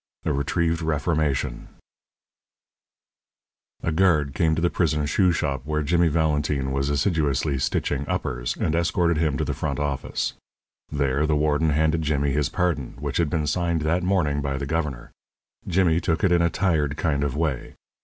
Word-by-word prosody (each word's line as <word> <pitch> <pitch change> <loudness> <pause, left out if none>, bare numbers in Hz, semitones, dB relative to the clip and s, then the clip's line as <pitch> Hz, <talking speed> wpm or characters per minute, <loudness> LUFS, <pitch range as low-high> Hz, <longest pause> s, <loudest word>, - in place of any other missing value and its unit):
X 80 - +1
A - - 0
RETRIEVED 80 +4 0
REFORMATION 75 -2 -1 2.2
A 85 - 0
guard 80 -5 +2
came 80 0 +2
to 80 - -2
the 85 - +2
prison 75 -4 +1
shoe 90 +4 +3
shop, 70 -5 -1
where 75 +1 -1
Jimmy 85 +3 +3
Valentine 75 -3 0
was 70 +1 -1
assiduously 70 -2 0
stitching 70 +1 -1
uppers, - - -2
and 80 - 0
escorted 85 0 +1
him 75 -4 +1
to - - -1
the - - -2
front - - -3
office. 70 -2 -2 0.6
There 70 0 +1
the 75 - +2
warden 75 +1 +2
handed 80 +2 +2
Jimmy 70 -2 0
his 70 0 0
pardon, 85 -8 -1
which - - -3
had 85 -3 +1
been 75 0 -1
signed 85 +1 0
that 80 +4 +1
morning 85 -6 +1
by 70 -1 -2
the 70 - -3
governor. 75 -4 -3 0.6
Jimmy 85 -2 +2
took 85 -2 -1
it 95 - +3
in 85 -1 +4
a 85 - +3
tired 80 -6 0
kind 75 -3 0
of 70 -1 -2
way. 75 -6 -2
75 Hz, 170 wpm, -24 LUFS, 70-85 Hz, 2.2 s, in